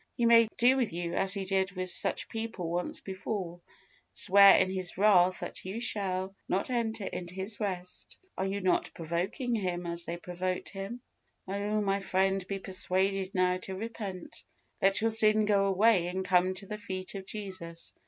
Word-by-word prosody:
He 240 - +2
may 230 -1 +7
do 255 +3 +5
with 250 -4 0
you 170 0 -3
as 195 0 +1
He 195 -1 -3
did 190 0 0
with 185 -1 -2
such - - 0
people 225 -7 -4
once 175 +1 -2
before 190 -2 -5 0.5
swear 200 0 +7
in - - +3
His 185 -2 -3
wrath 185 -3 +4
that - - -6
you 190 +5 -5
shall 195 -5 0 0.2
not 195 +7 0
enter 225 -3 -1
into 175 -1 -6
His 195 +3 -4
rest. 185 -4 -5 0.2
Are 190 - -1
you 200 +1 -2
not 185 -1 +1
provoking 175 +9 -2
Him 180 -5 -2
as 170 0 -3
they 170 - -4
provoked 180 +1 -4
Him? 200 +5 -6 0.5
Oh! 205 +2 -1
my 200 -1 +1
friend, 195 0 +1
be 195 - -2
persuaded 190 0 -1
now 180 0 +2
to 190 +1 -6
repent. 200 -3 -7 0.4
Let 195 +1 +3
your 225 0 +2
sin 215 -1 +4
go 200 -1 +3
away, 195 -1 +3
and 185 +1 -3
come 185 0 +3
to 195 +2 -3
the 210 +2 -6
feet 185 -2 -5
of 195 -1 -7
Jesus. 185 -5 -6
190 Hz, 180 wpm, -30 LUFS, 185-210 Hz, 0.5 s, may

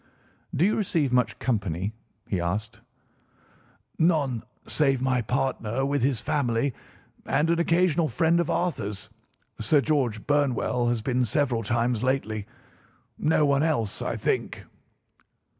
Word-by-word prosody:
"Do 165 - +3
you 210 - +2
receive 160 - 0
much 125 -1 +2
company?" 100 -4 -1 0.3
he 95 -4 -1
asked. 105 +6 -3 1.2
"None 150 -8 +2 0.3
save 135 -4 +2
my 130 -1 +1
partner 125 0 -1
with 140 0 0
his 130 -2 +1
family 125 -2 0 0.5
and 160 +3 +2
an 170 - +1
occasional 170 -1 +2
friend 165 +1 +2
of 170 - 0
Arthur's. 105 - -2 0.5
Sir 130 +8 +4
George 130 -8 0
Burnwell 130 -4 +1
has 120 -2 0
been 125 0 +1
several 125 0 +1
times 120 +1 0
lately. 115 -5 -1 0.7
No 155 -1 +3
one 140 0 +3
else, 145 -10 0
I - - -2
think." - - -2
130 Hz, 125 wpm, -26 LUFS, 115-150 Hz, 1.2 s, Sir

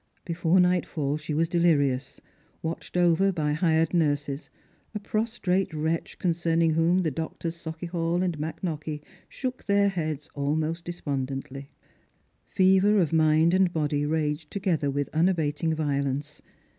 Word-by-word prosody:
Before 170 +1 +2
nightfall 170 -5 +1
she 155 0 -7
was 165 +2 +2
delirious, 145 -6 +1 0.4
watched 165 +2 -4
over 180 +2 +4
by 150 -4 -1
hired 160 0 +2
nurses, 145 -3 0 0.5
a - - -1
prostrate 205 -3 -1
wretch 160 +2 -2
concerning 165 -2 +1
whom 165 +3 +2
the 160 - 0
doctors 165 +3 -4
Sau 165 -1 -6
chiehall 170 +1 -1
and 175 -5 -2
McKnockie 155 -1 -4 0.3
shook 255 -1 -5
their 200 0 +3
heads 155 -5 -3
almost 155 +4 -1
despondently. 140 -4 -4 0.8
Fever 190 +2 +4
of 165 -4 +1
mind 160 +1 +4
and 185 -1 +3
body 150 -3 0
raged 150 0 -1
together 175 -7 0
with 145 0 -1
unabating 160 -2 +1
violence. 145 -1 -2
160 Hz, 130 wpm, -26 LUFS, 150-175 Hz, 0.8 s, over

